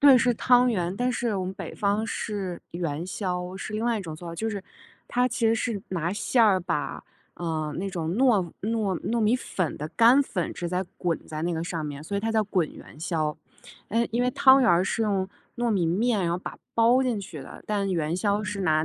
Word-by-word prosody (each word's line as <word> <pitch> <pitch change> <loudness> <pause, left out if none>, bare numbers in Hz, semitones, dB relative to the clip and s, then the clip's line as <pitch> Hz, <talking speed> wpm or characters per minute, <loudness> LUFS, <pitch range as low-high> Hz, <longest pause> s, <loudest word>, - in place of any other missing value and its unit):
对， 280 -2 +9
是 240 0 +3
汤 245 +1 +4
圆， 180 -3 -1
但 250 +2 +1
是 235 -3 -1
我 185 - -1
们 185 - -4
北 - - -7
方 205 +2 0
是 195 -6 -3
元 170 -1 -3
宵， 180 -1 -3
是 205 - -6
另 215 +1 -2
外 235 -2 +1
一 - - -5
种 160 -3 -6
做 170 +1 -8
法。 165 - -6
就 220 +6 -2
是 200 -3 -4 0.5
它 250 +1 +2
其 235 -1 0
实 225 - +4
是 220 -3 -2
拿 170 0 -1
馅 230 +3 +3
儿 190 -3 +4
把， 165 -5 -3 0.3
呃， 160 -3 -2
那 195 +1 -2
种 165 -3 -3
糯 220 -10 +3
糯 210 -5 0
糯 235 0 -1
米 220 +3 +4
粉 185 - -2
的 150 +2 -4
干 235 - +6
粉 185 -10 -3
直接 180 +2 -2
滚 170 -3 0
在 155 0 -5
那 175 0 0
个 160 - -2
上 165 -3 -3
面， 145 0 -6
所 200 - -5
以 200 - 0
它 225 - -1
叫 220 -1 +2
滚 185 -6 0
元 150 - -13
宵。 155 -3 -1 0.5
呃， 230 +3 +2
因 235 +2 +1
为 250 - +2
汤 265 +1 +6
圆 235 - +4
儿 175 +2 +4
是 230 - -1
用 195 -3 0 0.3
糯 240 -1 0
米 185 -5 +2
面 210 +5 +2
然 170 - 0
后 - - 0
把 - - -8 0.2
包 235 +3 +5
进 240 -6 0
去 160 -6 -8
的， 135 - -11
但 200 -2 0
元 165 -1 0
宵 205 +2 +1
是 205 -1 -3
拿 155 -2 +3
195 Hz, 250 characters per minute, -26 LUFS, 170-225 Hz, 0.5 s, 对